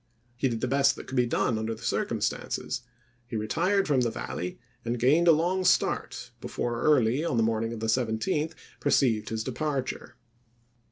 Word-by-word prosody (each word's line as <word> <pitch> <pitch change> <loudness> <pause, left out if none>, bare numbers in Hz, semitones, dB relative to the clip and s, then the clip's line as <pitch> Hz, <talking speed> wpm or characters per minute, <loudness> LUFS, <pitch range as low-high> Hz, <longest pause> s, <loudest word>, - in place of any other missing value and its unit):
He 130 +2 0
did 115 -2 -3
the 125 - 0
best 135 0 +3
that - - -9
could 130 - -7
be 125 -1 +3
done 115 -1 +1
under 110 +1 -2
the - - -14
cir - - 0
cumstances; 125 - -2 0.5
he 120 - -6
retired 185 - +1
from 140 -4 +3
the 120 - +1
Valley 90 -4 -5 0.3
and 120 +1 -2
gained 150 +8 +4
a - - +9
long 175 +4 +2
start, - - +1
before 120 -1 -3
Early 135 -2 +3
on 165 -8 0
the 115 - +4
morning 115 0 0
of 115 -2 -6
the - - -1
17th 125 +8 0 0.3
perceived 120 -7 +2
his 110 -1 -2
departure. 135 +1 -3
125 Hz, 180 wpm, -28 LUFS, 115-150 Hz, 0.5 s, a